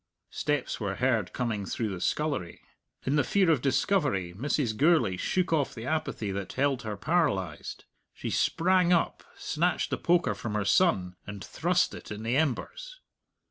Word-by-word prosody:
Steps 150 0 -1
were 100 -3 -2
heard 120 -2 +1
coming 115 -5 -2
through 110 +3 -2
the 95 -3 -5
scullery. 140 - -1 0.4
In 140 +3 +1
the 145 - +4
fear 190 -4 +3
of 145 -6 +2
discovery 135 - +1
Mrs. 130 0 -1
Gourlay 155 - +3
shook 180 - 0
off 145 -4 +1
the 115 0 -7
apathy 155 -8 -2
that 95 -1 -4
held 135 -1 +1
her 110 -3 -5
paralyzed. 130 - -1 0.3
She - - -5
sprang 180 +1 +2
up, 170 -2 +1
snatched 170 +2 0
the - - -1
poker 175 0 +2
from 110 -2 -5
her 105 -1 0
son, 95 - +2
and 100 -2 -7
thrust - - +1
it - - -9
in 105 +1 -6
the 115 +3 0
embers. - - -2
130 Hz, 165 wpm, -28 LUFS, 105-165 Hz, 0.4 s, the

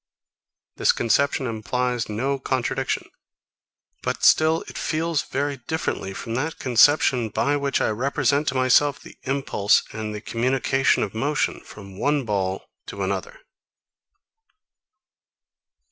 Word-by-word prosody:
This - - +4
conception 140 +3 +1
implies 120 +1 -2
no 135 +6 -1
contradiction; 130 -2 -2 0.9
but - - -3
still 160 +1 +4
it - - -10
feels 160 -1 -1
very 140 0 -3
differently 125 -7 -3
from 115 - -5
that 150 +6 -2
conception 130 -1 +4
by 145 +6 0
which 140 -1 0
I - - +1
represent 140 +5 0
to 135 - 0
myself 130 +2 +3
the - - -15
impulse 135 -7 +2
and 110 0 -4
the - - -4
communication 130 +4 +1
of 100 - -4
motion 145 +7 -1
from 100 -2 -12
one 145 -2 +1
ball 95 -3 -2 0.2
to - - -5
another. - - -4
130 Hz, 120 wpm, -23 LUFS, 115-145 Hz, 0.9 s, This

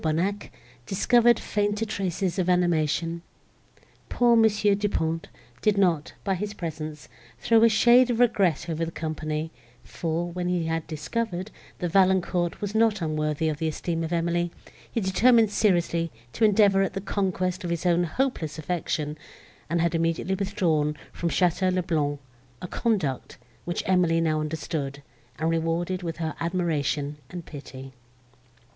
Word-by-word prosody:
Bonnac, 175 +6 -1 0.4
discovered 240 +4 +4
fainter 205 +1 -1
traces 190 -3 -2
of 185 0 +1
animation. 170 -1 +1 0.9
Poor 240 -1 +4
Mons. 220 -2 +4
Du 205 0 +3
Pont 165 -2 -1 0.3
did 210 -1 +2
not, 170 -6 +1
by 195 - 0
his 205 +3 -4
presence, 155 -3 -6 0.3
throw 225 -1 +4
a 230 - +7
shade 240 +3 +5
of 235 -1 0
regret 195 - +2
over 165 0 -2
the 165 - -2
company; 155 -1 -3 0.3
for, 170 +1 -3
when 180 0 -3
he 180 -2 0
had 165 0 -2
discovered, 185 +5 -3 0.3
that 175 -2 -3
Valancourt 185 -2 +2
was 205 0 -3
not 220 -1 +3
unworthy 155 -1 -1
of 155 -1 -2
the 160 - 0
esteem 165 +2 -2
of 160 - -4
Emily, 170 0 0 0.4
he - - -1
determined 220 +3 +4
seriously 170 -5 +1 0.2
to - - -1
endeavour 205 -2 +5
at 195 - 0
the 195 - -3
conquest 185 -1 -1
of 175 - -3
his 170 +1 -2
own 175 0 +3
hopeless 170 - -2
affection, 155 -2 -3 0.5
and 170 0 +1
had 170 0 +1
immediately 165 +2 0
withdrawn 175 -7 0 0.2
from 170 - -2
Château 185 +2 +2
le 185 0 0
Blanc—a 140 -5 -4
conduct, 190 - -1 0.3
which 175 - -2
Emily 180 -3 +3
now 155 -2 +1
understood, 150 -2 -4 0.3
and 160 +1 0
rewarded 165 +3 -1
with 165 -2 -4
her 160 -2 -2
admiration 155 -4 -1
and 175 0 -7
pity. 135 -2 -10
175 Hz, 150 wpm, -26 LUFS, 160-195 Hz, 0.9 s, a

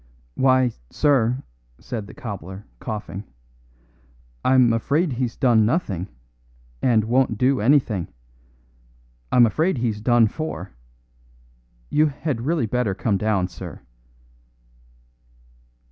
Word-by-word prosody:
"Why, 130 - +3 0.2
sir," 130 -4 +2 0.3
said 110 -4 -6
the - - -12
cobbler, 100 -3 -7
coughing, 105 -4 -5 1.2
"I'm 130 -3 +4
afraid 145 +7 +1
he's 120 -1 -2
done 120 -5 +4
nothing, 105 - -1 0.7
and 115 -4 +3
won't 120 0 +1
do 130 0 +2
anything. 115 - +2 1.2
I'm 120 -1 +6
afraid 155 - +1
he's 115 -3 -1
done 120 +1 +4
for. 110 - -5 1.2
You 155 +1 +4
had 140 -4 -3
really 160 -6 +1
better 110 -3 -1
come 100 -1 0
down, 105 -4 +1
sir." - - -9
120 Hz, 100 wpm, -23 LUFS, 105-135 Hz, 1.2 s, I'm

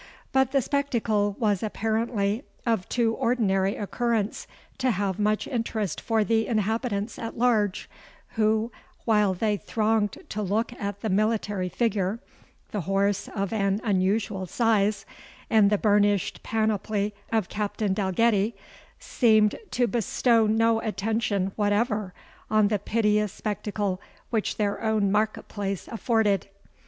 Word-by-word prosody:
But 265 -1 +2
the 275 -2 +2
spectacle 225 -8 0
was 205 -5 +1
apparently 220 +1 -1 0.2
of 225 -6 0
too 230 -2 +1
ordinary 200 -6 +1
occurrence 220 0 -1 0.3
to 260 0 +2
have 200 -3 -1
much 210 0 +1
interest 225 - -2
for 225 -2 +1
the 225 +2 +1
inhabitants 220 -1 -1
at 230 - -6
large, 220 -5 +1 0.4
who, 220 +1 +1 0.3
while 210 -4 +3
they 210 +2 0
thronged 215 -1 0
to 215 - -3
look 215 +5 -1
at 200 -3 -5
the 220 - -2
military 205 -2 0
figure, 210 0 0 0.5
the 205 - -2
horse 195 +3 0
of 200 +1 -2
an 200 -2 +1
unusual 195 -1 0
size, 215 -2 +1 0.5
and 215 -3 +5
the 210 - +2
burnished 205 -1 +2
panoply 215 -1 -1 0.2
of 220 -5 +1
Captain 210 -1 -2
Dalgetty, 205 +2 +1 0.4
seemed 215 -3 +3 0.2
to 245 - +1
bestow 235 -1 +2
no 225 +1 +3
attention 210 -3 -1
whatever 210 -1 0 0.4
on 215 -1 +3
the 210 -1 +1
piteous 210 -1 +1
spectacle 205 -2 -3 0.3
which 220 -3 -1
their 205 -2 -1
own 215 -3 +1
market 215 +1 0
place 195 -3 -4
afforded. 220 -4 +1
215 Hz, 125 wpm, -26 LUFS, 200-225 Hz, 0.5 s, and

